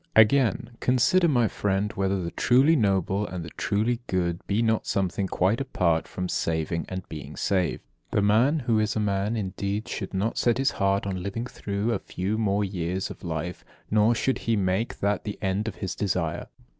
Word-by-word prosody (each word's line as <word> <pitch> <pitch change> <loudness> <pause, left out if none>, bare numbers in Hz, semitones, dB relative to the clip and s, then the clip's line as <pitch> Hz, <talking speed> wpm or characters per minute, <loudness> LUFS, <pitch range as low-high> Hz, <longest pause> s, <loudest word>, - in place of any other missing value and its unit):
46. - - +8
Again: 115 0 +4
"Consider, 170 +9 +3
my 120 -7 +3
friend, 100 +1 -1
whether 95 -1 0
the 85 - -4
truly 135 +6 +4
noble 100 - +1
and 90 -3 -5
the 80 - -9
truly 110 +4 0
good 85 -2 0
be 105 +3 +1
not 110 -1 +1
something 95 0 0
quite 95 +7 +1
apart 85 -11 +1
from 90 0 -4
saving 80 -1 -1
and 95 -1 -5
being 75 - -8
saved. 95 -3 0 0.3
The 100 - +1
man 120 +9 +3
who 115 -3 +2
is 105 -1 0
a - - 0
man 105 +2 0
indeed 100 +1 -3
should - - -5
not 105 +4 0
set 120 -1 +2
his 135 +1 +2
heart 100 -1 +1
on 95 -2 -3
living 100 +5 -3
through 105 -2 -2
a - - -1
few 100 +4 -3
more 105 -1 +1
years 95 -1 -2
of - - -11
life, 85 0 -4 0.3
nor 110 +2 +4
should 130 +3 0
he 115 - 0
make 95 +3 -1
that 100 +1 +1
the 105 - -5
end 100 +2 -1
of 110 - -4
his 95 -1 -4
desire. 90 -4 -2
100 Hz, 195 wpm, -26 LUFS, 95-115 Hz, 0.3 s, 46